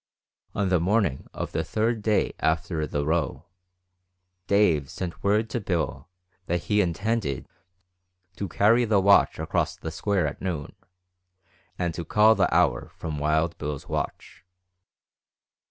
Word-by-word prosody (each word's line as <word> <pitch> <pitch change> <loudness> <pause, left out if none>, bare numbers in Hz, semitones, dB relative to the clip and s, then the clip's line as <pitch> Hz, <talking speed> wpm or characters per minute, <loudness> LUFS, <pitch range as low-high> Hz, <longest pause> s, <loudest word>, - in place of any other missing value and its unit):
On 100 -2 0
the 90 -2 +3
morning 95 -5 0
of - - -5
the 80 - -1
third 110 +7 -1
day 105 0 +1
after 80 -1 0
the 75 0 -2
row, 80 -2 -1 1.0
Dave 85 -9 +3
sent 90 -2 -6
word 105 +3 +2
to 120 - -1
Bill 90 -3 -2 0.4
that 85 0 -1
he 105 -1 +2
intended 90 - -1 0.9
"to 100 - -4
carry 110 +6 +3
the 105 -3 +3
watch 100 +1 +5
across - - -1
the 80 - -6
square 100 +3 0
at - - -4
noon, 85 -6 -4 1.0
and 85 -2 -1
to 85 - -5
call 105 +7 +5
the - - +1
hour - - +2
from 75 -2 -5
Wild 80 +3 +1
Bill's 75 -2 -5
watch." - - -5
90 Hz, 140 wpm, -26 LUFS, 80-105 Hz, 1.0 s, watch